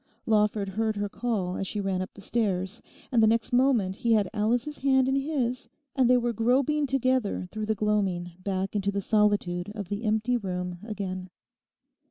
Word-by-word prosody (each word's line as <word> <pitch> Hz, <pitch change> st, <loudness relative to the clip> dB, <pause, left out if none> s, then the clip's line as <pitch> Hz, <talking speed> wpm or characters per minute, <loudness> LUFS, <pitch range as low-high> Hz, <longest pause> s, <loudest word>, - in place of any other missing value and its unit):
Lawford 210 Hz, -2 st, +2 dB
heard 220 Hz, +2 st, -1 dB
her 205 Hz, 0 st, -1 dB
call 200 Hz, -4 st, -2 dB
as 195 Hz, -, -3 dB
she 210 Hz, -, -3 dB
ran 195 Hz, -2 st, -1 dB
up 185 Hz, -, -5 dB
the 200 Hz, -, -11 dB
stairs; 195 Hz, -1 st, -1 dB, 0.3 s
and 235 Hz, -3 st, +4 dB
the 220 Hz, -, +6 dB
next 225 Hz, +2 st, +1 dB
moment 245 Hz, -7 st, +3 dB
he 235 Hz, -2 st, +2 dB
had 210 Hz, -3 st, +3 dB
Alice's 240 Hz, +7 st, 0 dB
hand 265 Hz, -1 st, +3 dB
in 265 Hz, -, +2 dB
his 270 Hz, -4 st, -1 dB, 0.3 s
and 260 Hz, -3 st, +3 dB
they 250 Hz, -, +6 dB
were 240 Hz, -1 st, 0 dB
groping 270 Hz, +6 st, +2 dB
together 255 Hz, -7 st, 0 dB
through 215 Hz, -1 st, -4 dB
the 220 Hz, -, +1 dB
gloaming 195 Hz, -4 st, 0 dB
back 190 Hz, +1 st, -2 dB
into 200 Hz, -1 st, 0 dB
the 200 Hz, -, -2 dB
solitude 205 Hz, -3 st, +1 dB
of 200 Hz, -4 st, -6 dB
the 205 Hz, +2 st, -3 dB
empty 220 Hz, +3 st, +1 dB
room 180 Hz, -4 st, -4 dB
again. 190 Hz, -4 st, -5 dB
215 Hz, 185 wpm, -27 LUFS, 195-240 Hz, 0.3 s, the